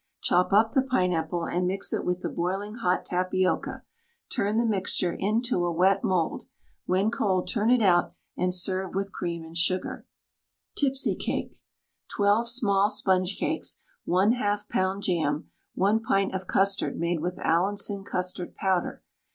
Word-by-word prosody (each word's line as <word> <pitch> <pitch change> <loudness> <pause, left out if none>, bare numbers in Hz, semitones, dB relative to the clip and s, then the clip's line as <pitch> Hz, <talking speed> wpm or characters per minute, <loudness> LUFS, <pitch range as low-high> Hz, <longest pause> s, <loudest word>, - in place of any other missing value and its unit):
Chop 180 +2 +2
up 220 +3 +4
the 270 - +3
pineapple 180 -9 0
and 180 0 -1
mix 195 +2 -1
it - - -1
with 180 0 -1
the - - -2
boiling 195 +4 -2
hot 185 -6 0
tapioca; 185 +1 -1 0.5
turn 205 +2 0
the 235 - +2
mixture 190 -4 0
into 215 -1 0
a 175 - 0
wet 185 +3 +3
mould. 180 -4 0 0.4
When 195 +4 +2
cold 190 -5 0
turn 220 -1 +1
it 250 -2 +4
out 175 -3 +3 0.2
and 180 0 0
serve 185 +1 -1
with 195 0 -2
cream 170 -1 -4
and 160 +1 -12
sugar. 180 +2 -1 0.7
TIPSY 270 -1 +1
CAKE. - - -3 0.6
12 205 +3 +3
small 205 -5 +2
sponge 190 -2 +1
cakes, - - -2 0.3
1/2 205 +2 +2
lb. 190 +1 0
jam, 160 -4 -1 0.2
1 205 +4 +3
pint 195 -3 +1
of 190 -1 -4
custard 195 0 +1
made 170 0 0
with 180 +3 -3
Allinson 200 +3 0
custard 180 -2 -4
powder. 190 -3 -1
190 Hz, 150 wpm, -27 LUFS, 180-205 Hz, 0.7 s, up